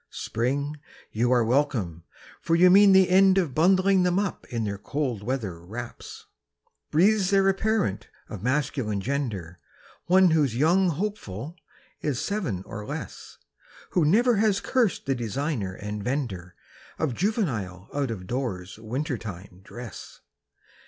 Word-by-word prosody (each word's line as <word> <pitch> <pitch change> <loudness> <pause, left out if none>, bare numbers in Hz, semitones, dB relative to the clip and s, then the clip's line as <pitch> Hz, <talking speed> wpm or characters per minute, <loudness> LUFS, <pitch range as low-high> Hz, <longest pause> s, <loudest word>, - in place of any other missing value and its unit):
Spring, 140 +6 -2 0.3
you 120 +3 +1
are 120 -2 +4
welcome, 115 - 0 0.4
for 165 - +1
you 180 +2 +6
mean 200 +1 +7
the 190 -1 +6
end 190 +1 +5
of 170 -8 +1
Bundling 185 +4 +4
them 180 0 +2
up 200 -1 -2
in 115 -2 -1
their 100 -2 -3
cold 130 -4 -3
weather 105 -8 -4
wraps. 120 +6 -8 0.6
Breathes 190 +4 +3
there 195 -1 +3
a 195 - +4
parent 210 - -1 0.2
of 105 - -8
masculine 125 -4 -1
gender, 100 - -3 0.5
One 185 0 +5
whose 145 -7 +2
young 175 +8 +3
hopeful 165 - -4 0.5
is 145 -5 -1
seven 170 - -2
or 105 -2 -7
less, - - -7 0.5
Who 175 - +2
never 225 +9 +4
has 205 -2 +2
cursed 245 -7 0
the 135 - +1
designer 120 -4 -3
and 105 0 -6
vender 100 -9 -3 0.4
Of 155 -6 -1
juvenile 115 - -2
out 140 -2 -1
of 100 -5 -5
doors 100 -5 -4
winter 125 +4 -3
time 95 -3 -9
dress? 120 +1 -10
135 Hz, 140 wpm, -26 LUFS, -, 0.6 s, mean